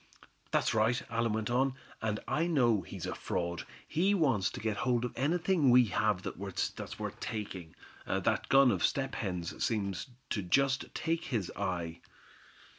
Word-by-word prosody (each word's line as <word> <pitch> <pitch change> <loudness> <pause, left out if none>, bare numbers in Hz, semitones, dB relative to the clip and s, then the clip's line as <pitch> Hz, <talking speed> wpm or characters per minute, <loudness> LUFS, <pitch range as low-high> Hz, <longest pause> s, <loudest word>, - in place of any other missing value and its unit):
"That's - - +2
right," 110 +3 +3
Allan 115 -1 +1
went 110 +1 -1
on, 130 +2 +2 0.3
"and 110 -1 -1
I 165 +3 +1
know 120 - +3
he's - - -7
a - - -2
fraud. 85 -1 -3 0.2
He 190 +5 +2
wants 130 - +2
to - - -7
get 110 -1 -1
hold 125 0 +1
of 125 - -4
anything 160 +2 +2
we 125 0 +7
have 105 -4 +1
that's 95 0 -4
worth - - -5
taking. 100 -8 -5 0.3
That - - 0
gun 135 -2 +7
of - - -1
Step 135 -1 +1
Hen's 90 -5 -3
seems 100 -4 -1 0.2
to 105 - 0
just 135 +9 +1
take 165 +1 -1
his 110 -8 -2
eye." 85 -3 -3
115 Hz, 160 wpm, -32 LUFS, 100-135 Hz, 0.3 s, we